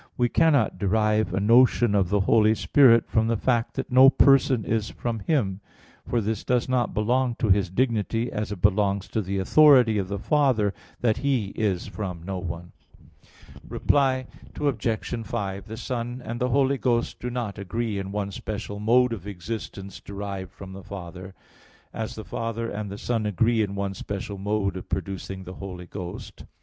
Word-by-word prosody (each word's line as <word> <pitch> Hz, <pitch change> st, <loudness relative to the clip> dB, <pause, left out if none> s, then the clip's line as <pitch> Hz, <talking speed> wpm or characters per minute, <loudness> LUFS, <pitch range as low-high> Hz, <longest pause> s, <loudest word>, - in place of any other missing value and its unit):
19, -, -, -27 dB
A. -, -, -36 dB
3), -, -, -43 dB
we 120 Hz, -1 st, +2 dB
cannot 140 Hz, -4 st, +3 dB
derive 110 Hz, +2 st, +1 dB
a -, -, 0 dB
notion 120 Hz, +1 st, +4 dB
of 95 Hz, -3 st, +2 dB
the 105 Hz, 0 st, +2 dB
Holy 110 Hz, +2 st, +4 dB
Spirit 115 Hz, -2 st, +5 dB
from 110 Hz, 0 st, +1 dB
the 115 Hz, 0 st, +1 dB
fact 120 Hz, 0 st, 0 dB
that 135 Hz, -1 st, -4 dB
no 130 Hz, +2 st, +8 dB
person 135 Hz, -4 st, +4 dB
is 110 Hz, -1 st, -1 dB
from 115 Hz, -2 st, -4 dB
Him. 100 Hz, -, -1 dB, 0.5 s
For 120 Hz, -, 0 dB
this 110 Hz, 0 st, -2 dB
does 125 Hz, -1 st, +1 dB
not 125 Hz, -3 st, 0 dB
belong 120 Hz, +3 st, +1 dB
to 115 Hz, -, -1 dB
His 95 Hz, -1 st, +3 dB
dignity, 115 Hz, +1 st, 0 dB
as 105 Hz, 0 st, -3 dB
it 100 Hz, -4 st, -7 dB
belongs 100 Hz, -1 st, +2 dB
to 110 Hz, -, -1 dB
the 100 Hz, 0 st, -3 dB
authority 125 Hz, 0 st, +5 dB
of 95 Hz, -, -2 dB
the 100 Hz, +1 st, -3 dB
Father 120 Hz, -5 st, +2 dB, 0.3 s
that 110 Hz, -3 st, +2 dB
He 130 Hz, -8 st, 0 dB
is 100 Hz, -4 st, -1 dB
from 95 Hz, -5 st, -6 dB
no 95 Hz, +1 st, -4 dB
one. 85 Hz, -1 st, -6 dB, 1.0 s
Reply 130 Hz, -2 st, +1 dB, 0.3 s
Obj. 125 Hz, -6 st, -1 dB, 0.2 s
5: 100 Hz, -1 st, -4 dB
The 110 Hz, +1 st, -7 dB
Son 120 Hz, 0 st, -4 dB
and 120 Hz, +1 st, -4 dB
the 125 Hz, -, +1 dB
Holy 135 Hz, +1 st, +2 dB
Ghost 120 Hz, -2 st, 0 dB
do 125 Hz, -, -4 dB
not 120 Hz, -5 st, -4 dB
agree 105 Hz, +2 st, -3 dB
in 95 Hz, 0 st, -5 dB
one 100 Hz, -1 st, -3 dB
special 100 Hz, +1 st, -6 dB
mode 120 Hz, +3 st, +3 dB
of 100 Hz, -3 st, -7 dB
existence 100 Hz, 0 st, -6 dB
derived 100 Hz, -2 st, -6 dB
from 95 Hz, 0 st, -11 dB
the 95 Hz, -, -9 dB
Father; 95 Hz, 0 st, -9 dB, 0.6 s
as 110 Hz, -1 st, -4 dB
the 110 Hz, -, -8 dB
Father 115 Hz, +3 st, -3 dB
and 105 Hz, 0 st, -4 dB
the 100 Hz, -, -7 dB
Son 115 Hz, -1 st, -1 dB
agree 110 Hz, +3 st, +2 dB
in 100 Hz, -2 st, -2 dB
one 100 Hz, 0 st, -2 dB
special 100 Hz, +1 st, -6 dB
mode 100 Hz, -1 st, -1 dB
of 95 Hz, -, -9 dB
producing 95 Hz, -1 st, -4 dB
the 90 Hz, 0 st, -9 dB
Holy 90 Hz, -2 st, -7 dB
Ghost. 90 Hz, -1 st, -8 dB
105 Hz, 185 wpm, -25 LUFS, 100-120 Hz, 1.0 s, no